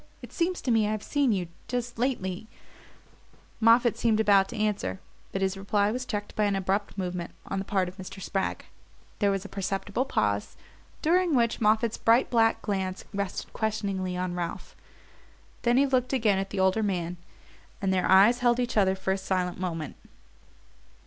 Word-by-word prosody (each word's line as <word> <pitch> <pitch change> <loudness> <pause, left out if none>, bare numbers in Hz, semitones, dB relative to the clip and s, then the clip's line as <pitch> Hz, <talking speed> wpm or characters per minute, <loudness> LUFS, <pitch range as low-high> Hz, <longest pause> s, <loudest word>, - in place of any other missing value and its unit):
It - - -10
seems 355 +1 -1
to 250 - -1
me 220 -2 +3
I've 215 0 -2
seen 285 -4 +1
you 185 -4 -1 0.2
just 245 -2 -3
lately 220 -5 -2 0.6
" - - -30
Moffatt 230 +1 +5
seemed 220 -2 +2
about 200 -3 +5
to - - -7
answer, 205 - -1 0.3
but 195 - -2
his 190 0 0
reply 200 +1 +1
was 250 +2 -4
checked 205 -4 -4
by 210 - +2
an 200 -1 +1
abrupt 195 +2 -1
movement 180 -2 -4
on 195 - -3
the 195 - -4
part 190 -2 0
of 180 +2 -9
Mr. 190 0 -8
Spragg. 195 0 -2 0.5
There 205 - +3
was 195 0 -1
a - - -5
perceptible 195 +5 -2
pause, 105 - -1 0.5
during 345 0 +3
which 235 -2 +1
Moffatt's 220 +1 +2
bright 230 +3 +3
black 225 -2 +3
glance 190 -2 -2
rested 200 -1 -4
questioningly 200 -4 -2
on 180 0 -2
Ralph; 175 -1 -5 0.9
then 240 +1 +3
he 275 - +5
looked 255 -1 0
again 220 -7 +2
at 195 0 -3
the - - -4
older 190 +3 +3
man, 180 -4 -2 0.6
and 190 -1 0
their 185 - +1
eyes 200 +6 +6
held 240 0 +3
each 245 -2 -1
other 190 -2 +4
for 190 0 -2
a 195 - -3
silent 185 -2 -1
moment. 165 -4 -4
200 Hz, 180 wpm, -27 LUFS, 190-230 Hz, 0.9 s, eyes